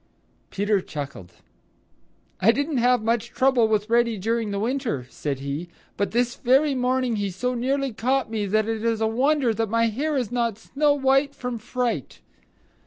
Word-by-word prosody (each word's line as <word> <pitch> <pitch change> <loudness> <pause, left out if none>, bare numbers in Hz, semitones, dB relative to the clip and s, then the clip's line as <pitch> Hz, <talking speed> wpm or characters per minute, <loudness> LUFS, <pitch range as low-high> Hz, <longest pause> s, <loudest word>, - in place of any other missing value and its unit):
Peter 205 0 +1
chuckled. 140 - -7 1.1
"I 225 - +5
didn't 285 +3 -1
have 245 -1 +3
much 230 +1 0
trouble 260 -3 +3
with 215 -1 0
Reddy 235 -1 +2
during 225 +2 -1
the 200 - -2
winter," 230 - -2
said 140 -3 -4
he, 140 +5 -4 0.3
"but 200 -2 -1
this 240 +1 0
very 270 +4 +3
morning 255 -2 0
he 200 -1 -1
so 250 +8 -2
nearly 265 +1 -1
caught 255 +6 0
me 210 -2 -1
that 215 +2 +1
it 225 -1 -2
is 230 -1 +1
a 220 - +1
wonder 255 +2 +2
that 225 -1 -1
my 230 +1 +2
hair 290 +7 -1
is 245 -5 -2
not 235 -4 0
snow 285 +5 +1
white 270 +1 +2
from 250 -2 -4
fright." 230 - -3
230 Hz, 175 wpm, -24 LUFS, 215-260 Hz, 1.1 s, I